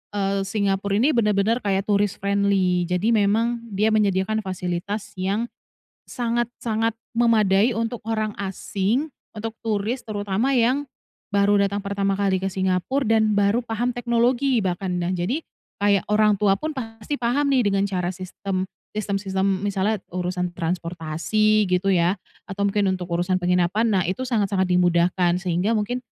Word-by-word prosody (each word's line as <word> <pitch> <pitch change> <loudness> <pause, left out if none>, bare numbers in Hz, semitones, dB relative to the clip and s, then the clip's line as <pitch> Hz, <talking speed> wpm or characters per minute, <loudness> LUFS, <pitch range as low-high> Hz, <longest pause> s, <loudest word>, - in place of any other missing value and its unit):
eee, 195 -1 0
Singapura 200 -1 0
ini 255 +9 +3
bener-bener 215 -1 +2
kayak 195 -3 0
tourist 205 -1 0
friendly, 195 -3 +2
jadi 180 +6 +1
memang 225 +3 +2 0.2
dia 215 +3 +2
menyediakan 210 0 +1
fasilitas 190 +2 -4
yang 205 +5 -1 0.5
sangat-sangat 235 -2 -1 0.2
memadai 220 -2 +4
untuk 230 +1 -3
orang 215 -1 -2
asing, 200 +6 -1 0.2
untuk 225 +1 -6
turis 220 +3 -1
terutama 205 +4 -1
yang 255 +2 +2 0.5
baru 200 0 +3
datang 200 +1 -1
pertama 200 0 -1
kali 190 -2 +1
ke 195 - -1
Singapura 190 +8 0
dan 220 -1 +3
baru 205 +4 +2
paham 235 +2 -2
teknologi 245 +2 +2
bahkan. 185 -1 -2
Nah, 175 +2 -1
jadi 185 - -1 0.4
kayak 200 -1 +3
orang 210 0 +4
tua 200 -1 +2
pun 310 0 -4
pasti 225 +1 -5
paham 270 +3 0
nih 240 -6 +3
dengan 195 0 +1
cara 180 -2 -2
sistem 185 +1 -4 0.3
sistem-sistem, 195 -2 -1
misalnya 205 +2 0 0.2
urusan 180 0 -2
transportasi 175 +5 0
gitu 180 +2 +2
ya, 175 +1 +3 0.3
atau 200 -1 -1
mungkin 200 -1 +1
untuk 180 -1 -5
urusan 180 +2 +1
penginapan, 180 +5 +2
nah 190 -4 +2
itu 185 +8 -2
sangat-sangat 200 -5 +1
dimudahkan, 175 0 +2
sehingga 180 +4 0
mungkin 220 +3 -1
200 Hz, 140 wpm, -23 LUFS, 190-225 Hz, 0.5 s, memadai